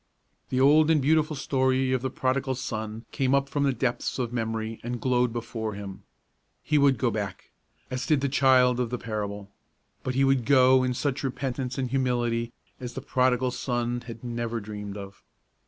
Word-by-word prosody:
The 130 - 0
old 150 +3 +5
and 160 -2 +4
beautiful 155 +2 +2
story 130 -1 +1
of 130 - 0
the 130 - -1
Prodigal 130 +1 -1
Son 110 -2 -5
came 135 0 +1
up 140 0 +1
from 145 - -2
the 140 - +3
depths 125 - -2
of 125 -2 -2
memory 110 -1 -3
and 120 +1 -4
glowed 125 0 +2
before 115 -2 -4
him. 100 -2 -8 0.6
He 150 - +2
would 140 -2 +4
go 120 +2 +1
back, 100 -3 -5 0.4
as 130 0 -3
did 150 -4 +3
the 140 - +1
child 130 -2 +4
of 125 -2 0
the 125 - -2
parable; 105 -3 -5 0.5
but 130 - -3
he 135 - +3
would 135 -2 +3
go 130 -1 +5
in 125 -1 0
such 140 +1 -1
repentance 130 -1 -3
and 130 -3 -2
humility 120 -3 0 0.3
as 125 -1 -6
the 135 - -4
Prodigal 130 -1 +1
Son 120 -1 -2
had 115 -1 -9
never 120 -1 -3
dreamed 105 -1 -7
of. 100 -1 -10
125 Hz, 185 wpm, -27 LUFS, 115-135 Hz, 0.6 s, old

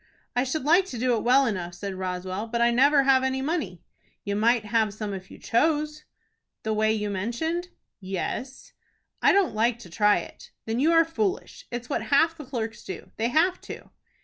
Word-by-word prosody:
"I 245 - +3
should 270 +2 -2
like 340 +6 +4
to 255 - -7
do 245 +1 +2
it 220 - -1
well 265 +3 +5
enough," 180 -6 -3
said 195 +1 -5
Roswell, 185 +2 -4
"but 235 +1 -2
I 235 0 +4
never 275 +4 +5
have 265 -1 +4
any 265 0 0
money." 265 - -3 0.4
"You 200 0 -2
might 225 +1 +2
have 215 -1 +1
some 215 -2 -4
if 190 -1 -8
you - - -12
chose." 305 +4 0 0.6
"The 220 - -1
way 215 0 +2
you 210 -1 -1
mentioned?" 280 - -2 0.3
"Yes." 195 +7 -5 0.5
"I - - +6
don't 395 - +2
like 230 +2 +1
to 220 -8 -13
try 210 +2 +4
it." 170 - -9 0.2
"Then 225 +2 -2
you 310 +5 +3
are 330 0 +5
foolish. 375 +4 -3
It's 240 0 -5
what 280 - -1
half 320 +3 +3
the 305 -3 -9
clerks 225 -4 -5
do. 185 - -8
They 225 - +1
have 335 +8 +2
to." - - -10
235 Hz, 200 wpm, -26 LUFS, 210-295 Hz, 0.6 s, I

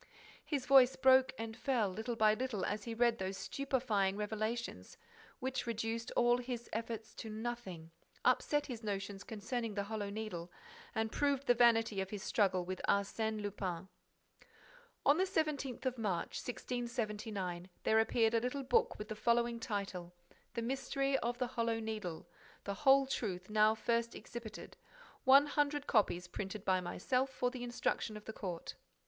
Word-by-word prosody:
His 280 -4 -2
voice 265 -2 +7
broke 260 0 +6
and 225 0 -5
fell, 245 -3 +1
little 220 +5 -3
by 215 -1 +5
little, 235 -4 -2
as 210 - -2
he 230 -1 -4
read 235 0 +3
those 190 0 -3
stupefying 235 -9 0
revelations, 215 - -3 0.4
which 260 -1 -3
reduced 230 +1 -2
all 240 0 +4
his 245 -1 -5
efforts 225 -1 -4
to 220 - -7
nothing, 215 -7 -5 0.3
upset 290 +3 +3
his 240 -5 -6
notions 200 -1 -3
concerning 225 +1 -3
the 200 - 0
Hollow 205 -1 -3
Needle 200 -5 -5 0.4
and 220 0 0
proved 280 -1 +1
the 245 - +6
vanity 225 -4 +4
of 190 - -4
his 205 -1 -5
struggle 185 -4 +2
with 185 +1 -4
Arsène 215 +2 +1
Lupin: 190 -3 -3 0.4
SIR: - - -27 0.6
On 285 - +6
the 375 - +4
17th 300 -8 -1
of 255 -2 -1
March, 190 -6 -1
1679, 215 -7 -3
there 220 - +4
appeared 225 0 +3
a 230 - +3
little 250 +3 -2
book 260 -1 +2
with 210 - -6
the 215 - -4
following 235 +2 +2
title: 195 -6 -4 0.4
_The 235 - -1
Mystery 275 +2 0
of 240 +1 -2
the 250 - 0
Hollow 230 -2 -1
Needle. 215 -7 -4 0.4
The 200 - -2
Whole 275 +3 +5
Truth 195 -7 -3
now 215 0 +5
first 235 +1 0
exhibited. 235 -2 -8 0.5
One 275 +2 +8
hundred 290 0 0
copies 180 -5 +2
printed 195 +2 -5
by 185 -1 +3
myself 250 +9 0
for 250 -1 -1
the 250 -1 -6
instruction 240 -2 -1
of 210 - -12
the 220 - -6
Court. 180 -6 -5
225 Hz, 160 wpm, -35 LUFS, 205-250 Hz, 0.6 s, One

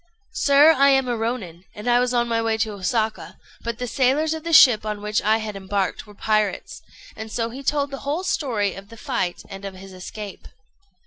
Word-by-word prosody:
"Sir, 285 +2 +6
I 275 +1 +5
am 265 -1 +3
a 240 - 0
Rônin, 220 -7 -4
and 210 - -9
was 245 0 +3
on 240 -1 +1
my 230 -1 0
way 225 -1 0
to 220 -1 -1
Osaka; 215 +3 -2 0.3
but 235 -1 -3
the 250 - -3
sailors 275 +6 +1
of 320 -1 -6
the 335 - -3
ship 250 -9 +7
on 210 -1 -4
which 210 0 0
I 215 +1 +3
had 215 -2 -5
embarked 195 +1 -2
were 210 - -14
pirates;" 215 -1 -1 0.3
and 220 0 -8
so 230 0 -2
he 265 +3 -8
told 285 0 0
the 275 - -6
whole 300 +6 -3
story 225 - -1
of 195 +1 -11
the 230 - -12
fight 180 -4 -3
and 195 0 -9
of 195 -1 -6
his 190 +1 -12
escape. 200 +2 -9
225 Hz, 210 wpm, -23 LUFS, 205-260 Hz, 0.3 s, ship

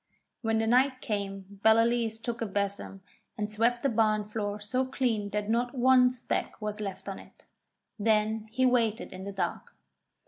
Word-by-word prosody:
When 225 -1 +1
the 225 - +1
night 255 +3 +3
came 200 -2 -4
Ballaleece 225 0 +3
took 235 0 -4
a 225 - 0
besom 200 -1 -3 0.4
and 210 -1 -2
swept 235 +3 +1
the 275 - +3
barn 215 -2 +2
floor 210 -1 -3
so 250 +5 -1
clean 245 -6 -1
that 210 0 -2
not 240 +3 0
one 250 0 +6
speck 250 -1 -3
was 210 0 -4
left 195 -1 -6
on 195 - -5
it. - - -17 0.5
Then 215 0 +1
he 260 +4 +1
waited 235 -3 +1
in 185 +1 -8
the 200 - -4
dark. 195 - -4
220 Hz, 170 wpm, -29 LUFS, 205-240 Hz, 0.5 s, one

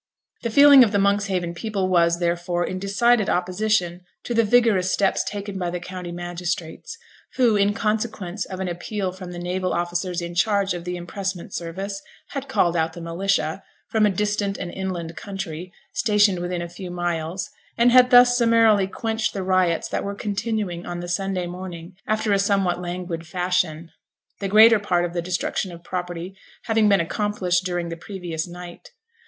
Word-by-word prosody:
The 235 - -2
feeling 280 +2 +8
of 220 - +1
the 205 - +1
Monkshaven 200 -3 +1
people 195 +1 -2
was, 170 -2 +3
therefore, 175 0 -1
in 185 - -4
decided 210 +3 +2
opposition 180 -1 0 0.2
to 240 - -3
the 230 0 +4
vigorous 215 -5 +3
steps 195 -1 +2
taken 200 -1 -5
by 175 -1 -1
the 180 +1 -3
county 180 0 -7
magistrates, 175 - -5 0.4
who, 240 -4 +4
in 200 0 +2
consequence 215 -4 -2
of 185 - -7
an 190 - -2
appeal 185 +2 -3
from 185 -1 -9
the 175 - -7
naval 180 +1 -2
officers 175 +1 -2
in 170 0 -5
charge 200 +1 +1
of 175 -1 -6
the 180 0 -3
impressment 190 +1 -5
service, 195 +4 -5 0.3
had 275 -1 -5
called 175 -10 +2
out 160 -1 0
the 170 - -9
militia 170 +1 -1 0.3
(from 215 -1 +4
a - - +2
distant 205 0 -1
and 175 - -5
inland 175 -4 -4
county) 185 -3 -6 0.2
stationed 205 -4 +3
within 175 0 -3
a - - -5
few 175 +2 -8
miles, 175 0 -3 0.3
and 240 +1 +5
had 250 0 +7
thus 245 -1 +7
summarily 230 -4 +4
quenched 220 +3 -2
the 195 - -3
riots 185 -3 +1
that - - -2
were 200 0 -4
continuing 200 -3 -3
on 175 0 -5
the 175 - -6
Sunday 185 +1 -1
morning 175 0 -8
after 215 -1 +1
a 200 - +3
somewhat 195 -3 +1
languid 175 -2 -5
fashion; 175 -2 -1 0.5
the 200 - -2
greater 220 +2 +7
part 180 -4 +1
of 175 - -5
the 175 - -1
destruction 180 +1 -2
of 170 0 -11
property 180 0 -5 0.3
having 220 -2 +3
been 200 -1 +5
accomplished 180 0 0
during 175 -2 -2
the 165 - -4
previous 175 -3 -5
night. 175 0 -10
185 Hz, 175 wpm, -23 LUFS, 175-205 Hz, 0.5 s, feeling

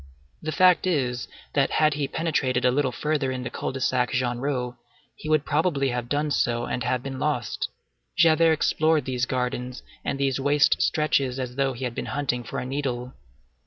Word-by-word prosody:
The 155 - -3
fact 185 +3 +4
is, 125 - 0 0.3
that - - +3
had 155 -1 +3
he 145 -1 -1
penetrated 135 -7 0
a 125 - +5
little 135 0 +1
further 145 +1 -1
in 130 -1 -4
the 125 - -5
Cul - - -3
de 135 - -5
Sac 125 -1 +1
Genrot, 125 0 -1 0.4
he 155 - -7
would 155 -2 +3
probably 150 -3 +1
have 120 -1 -3
done 145 +1 0
so 120 -3 +1
and 125 - -3
have 125 -1 -1
been 135 -1 -5
lost. 145 -5 -1 0.5
Javert 165 -1 +5
explored 155 0 +2
these 130 0 -1
gardens 125 0 -3 0.2
and 135 - -2
these 135 -1 +1
waste 145 +1 +3
stretches 140 -4 +1
as 125 -2 -4
though 135 -1 +1
he 125 +2 -7
had 125 -2 -2
been - - -4
hunting 125 -4 -1
for - - -6
a - - -3
needle. 130 -2 -3
135 Hz, 190 wpm, -25 LUFS, 125-150 Hz, 0.5 s, a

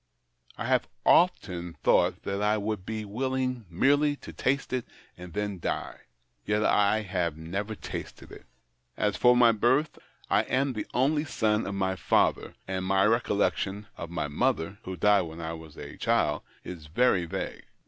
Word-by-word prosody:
I - - -4
have - - +2 0.2
often 90 - +3
thought - - +3
that 100 +1 -2
I 105 +1 +2
would 105 -2 -3
be 110 -1 -3
willing 130 +1 -2
merely 145 - +3
to - - -11
taste 135 0 -1
it 125 -2 -2 0.3
and 90 -1 -10
then 105 -1 -3
die. - - -3 0.4
Yet 105 - +1
I 105 +1 +3
have 90 -5 -2
never 100 +7 -4
tasted - - -8
it. - - -13 0.5
As 105 -2 +1
for 125 +5 +5
my 120 -1 +7
Ijirtli, 130 +7 +1 0.3
I - - +3
am 135 +1 0
the 105 - -4
only 150 +4 +2
son 110 -7 0
of 100 - -3
my 95 -1 0
father, - - +1
and 95 -1 -2
my 95 +1 +3
recollection 105 -2 +1
of 85 - -7
my 85 -3 -2
mother 80 +6 -1
— - - -36
who 95 0 -5
died 105 0 +4
when 80 -1 -7
I 80 0 -4
was 80 -2 -11
a - - -9
child - - +1
— - - -32
is 85 -4 -8
very 95 0 +2
vague. 80 - -5
105 Hz, 175 wpm, -28 LUFS, 90-120 Hz, 0.5 s, my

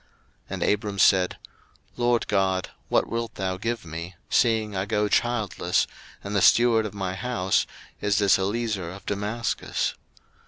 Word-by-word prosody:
01:015:002 - - -35 0.4
And - - -3
Abram 105 -1 0
said, 95 -1 +4 0.6
LORD 120 -1 +1
God, 95 -2 +1 0.2
what - - +2
wilt 115 0 -3
thou 95 -1 -2
give 115 +1 -3
me, 85 +3 -7 0.2
seeing 110 -4 +2
I 95 +1 -1
go 105 0 +1
childless, 110 -3 +1 0.4
and 100 +1 -4
the 100 - +3
steward 115 +1 +5
of 105 - -10
my 95 -2 -2
house 95 -3 0 0.3
is 105 -1 +1
this 100 -2 +4
Eliezer 100 -2 -1
of 95 +3 -10
Damascus? 105 +3 -2
105 Hz, 150 wpm, -25 LUFS, 95-115 Hz, 0.6 s, steward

